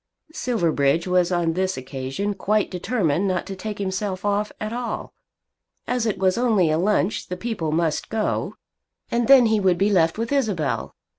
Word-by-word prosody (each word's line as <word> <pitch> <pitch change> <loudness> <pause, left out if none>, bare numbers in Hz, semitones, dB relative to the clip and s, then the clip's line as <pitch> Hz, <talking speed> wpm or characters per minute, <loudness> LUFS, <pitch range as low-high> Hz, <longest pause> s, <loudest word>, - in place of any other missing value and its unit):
Silverbridge 165 - +1
was 180 -1 +2
on 170 -2 +1
this 185 -1 -1
occasion 135 +10 -4
quite 210 +1 0
determined 185 - 0
not 185 -2 -1
to 195 - -6
take 210 +2 -5
himself 190 0 -3
off 205 +1 0
at 215 +1 -4
all. 245 0 -4 0.7
As 245 -2 0
it 215 - -1
was 190 +3 +1
only 210 -10 +3
a 155 - +1
lunch 205 +1 +1
the 180 - -5
people 185 -7 -3
must 160 -1 0
go, 220 -1 -1 0.6
and 235 -1 +1
then 270 -3 +8
he 220 -1 +3
would 185 -3 +2
be 200 +3 +2
left 165 -3 +3
with 230 +2 -3
Isabel. 210 - -1
195 Hz, 170 wpm, -23 LUFS, 170-220 Hz, 0.7 s, then